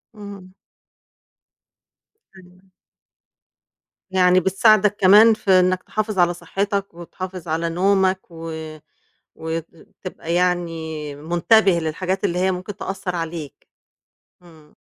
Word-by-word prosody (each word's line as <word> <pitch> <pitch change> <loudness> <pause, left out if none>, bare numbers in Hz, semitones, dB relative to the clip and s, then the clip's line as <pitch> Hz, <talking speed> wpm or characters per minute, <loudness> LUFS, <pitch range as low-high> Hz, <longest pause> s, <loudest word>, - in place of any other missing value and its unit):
اهم. 200 -3 -11 1.8
أيوه. 185 +1 -20 1.4
يعني 185 -1 +4
بتساعدك 205 +2 +3
كمان 210 +4 +7
في 210 -2 -2
إنّك 185 0 +1
تحافظ 215 -2 -3
على 175 0 +3
صحّتك 200 +2 -3
وتحافظ 180 +1 -8
على 165 +1 -1
نومك 190 +2 +2
و 165 0 -7 0.8
وت 160 0 -4 0.4
تبقى 170 -2 -6
يعني 165 -4 -2
منتبه 175 +7 +3
للحاجات 185 +5 -3
اللي 180 -3 0
هي 190 +1 +2
ممكن 185 +2 -6
تأثّر 190 -2 -5
عليك، 165 -4 -6 0.7
إمم. 160 -4 -19
180 Hz, 100 wpm, -21 LUFS, 165-195 Hz, 1.8 s, كمان